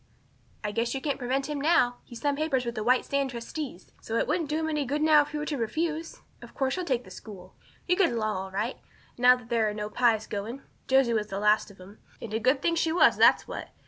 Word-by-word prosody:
"I 210 - -2
guess 230 +4 -1
you - - -1
can't 285 -1 -2
prevent 265 +2 -1
him 295 -2 -3
now. 285 -6 +3
He's 240 - -10
signed 285 -1 0
papers 280 -5 0
with 235 - -3
the 215 -2 -4
White 250 +3 +3
Sands 275 -2 -1
trustees. 235 - -7
So 225 - -5
it - - 0
wouldn't 310 -1 -1
do 305 - 0
him 320 0 -1
any 300 -2 -1
good 290 +3 -1
now 310 -1 +6
if 290 - -5
you 300 - -3
were 300 - -3
to 300 -2 -3
refuse. 320 +7 -3 0.2
Of - - -13
course 265 -1 0
you'll 365 -1 -3
take 250 -3 0
the - - -14
school. 190 -4 -11 0.3
You'll 360 +1 +2
get 370 -4 +4
along 215 -2 -1
all 190 +1 -4
right, 210 +6 -3 0.4
now 250 +1 +7
that 245 -2 -13
there 225 -2 +2
are 210 - -5
no 210 0 -5
Pyes 225 -3 +2
going. 220 +6 -5 0.2
Josie 265 -3 +3
was 215 -2 0
the 195 - -5
last 210 +1 +2
of 200 - -16
them, 190 +3 -14 0.2
and 220 -2 -8
a 220 - 0
good 260 +4 +1
thing 335 - +2
she 330 -1 +1
was, 345 - +5
that's - - +5
what. - - -7
250 Hz, 260 wpm, -27 LUFS, 220-300 Hz, 0.4 s, now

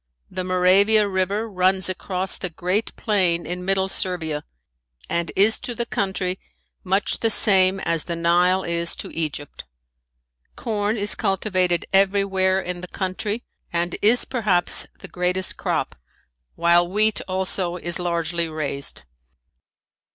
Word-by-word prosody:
The 185 0 -3
Moravia 190 +4 +4
river 195 +3 -1
runs 190 -2 +2
across 185 0 -1
the 180 - -4
great 180 +6 -2
plain 185 -6 0
in 180 +1 -5
middle 190 0 +1
Servia 165 -6 0 0.6
and 170 0 -2
is 210 +3 +4
to 245 -2 -5
the 235 - -1
country 190 -4 -2 0.4
much 195 +2 0
the 225 - +1
same 195 -3 +4
as 165 -4 -1
the 170 - -3
Nile 175 +3 +2
is 170 0 -1
to - - -8
Egypt. 150 -3 -4 0.9
Corn 215 -1 -2
is 205 0 +3
cultivated 185 -3 0
everywhere 195 -1 +2
in 180 -1 -5
the 180 - -7
country 205 +5 -3 0.3
and 170 0 -1
is 230 +4 +5
perhaps 210 -8 +1
the - - -8
greatest 180 +1 -2
crop, - - -2 0.6
while 175 +1 +3
wheat 215 +3 +1
also 185 -1 -1
is 175 -1 -2
largely 170 -1 -1
raised. 140 - -3
185 Hz, 130 wpm, -22 LUFS, 175-200 Hz, 0.9 s, is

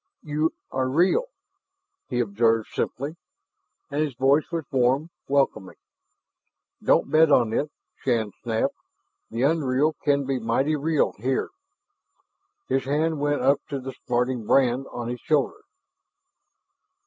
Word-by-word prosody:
"You 155 +1 0 0.2
are 130 -1 0
real," 180 - +3 0.8
he 125 -3 -1
observed 115 +1 +1
simply, 145 +6 -3 0.7
and 145 +2 0
his 145 -5 -1
voice 135 +4 +3
was 165 -3 -2
warm, 135 +5 +2 0.2
welcoming. 135 -9 0 1.1
"Don't - - +2
bet 155 0 +5
on 120 -5 +4
it," 145 +5 0 0.3
Shann 115 -5 0
snapped. 115 -2 0 0.6
"The 115 +3 -2
unreal 145 0 +2
can 140 -1 +2
be 135 -1 -1
mighty 130 +7 +1
real 155 +1 +1
here." 130 +4 -1 1.2
His 135 -1 0
hand 155 +3 0
went 145 -2 0
up 135 +2 +4
to 140 -2 -3
the 135 0 -7
smarting 125 -2 0
brand 130 0 +3
on 120 -1 -5
his 125 0 -4
shoulder. 150 -3 0
135 Hz, 125 wpm, -25 LUFS, 125-150 Hz, 1.2 s, bet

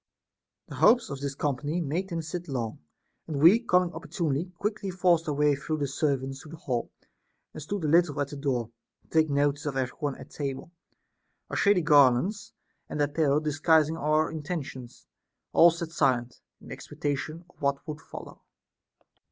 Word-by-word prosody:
31. - - -8
The - - +8
hopes 245 -1 +4
of 140 - -5
this 140 -1 -3
company 145 +4 -1
made 170 +4 -2
them 165 -2 -3
sit 175 +2 -5
long; 120 -6 -3 0.5
and 150 -3 -3
we 170 +9 +7
coming 180 -6 +2
opportunely 165 -2 -2
quickly 210 0 -2
forced 175 -3 +2
our - - 0
way 150 0 +3
through 150 +3 -3
the 145 -2 -1
servants 135 -1 -1
to 155 - -13
the 165 - -8
hall, 130 -8 -3 0.6
and 155 - -8
stood 195 +5 -4
a - - +1
little 160 -1 +3
at 140 -1 -1
the 145 - -7
door, 130 -5 -2 0.3
to - - -31
take 160 -1 +3
notice 145 +1 +1
of 135 -2 -2
every 130 -2 -2
one 145 -4 -2
at - - -12
table; 140 +2 -5 0.8
our - - -3
shady 200 -4 +3
garlands 150 - +4 0.4
and - - -4
apparel 145 0 +2
disguising 155 +1 +2
our 155 0 +1
intentions, 150 -6 -6 0.5
all 170 - +8
sat 165 -1 -5
silent, 125 -6 0 0.2
in - - -14
expecta 145 -1 -3
tion 155 +6 -7
of 180 - -26
what 140 -1 -1
would 155 0 -6
follow. - - -11
150 Hz, 175 wpm, -28 LUFS, 140-170 Hz, 0.8 s, The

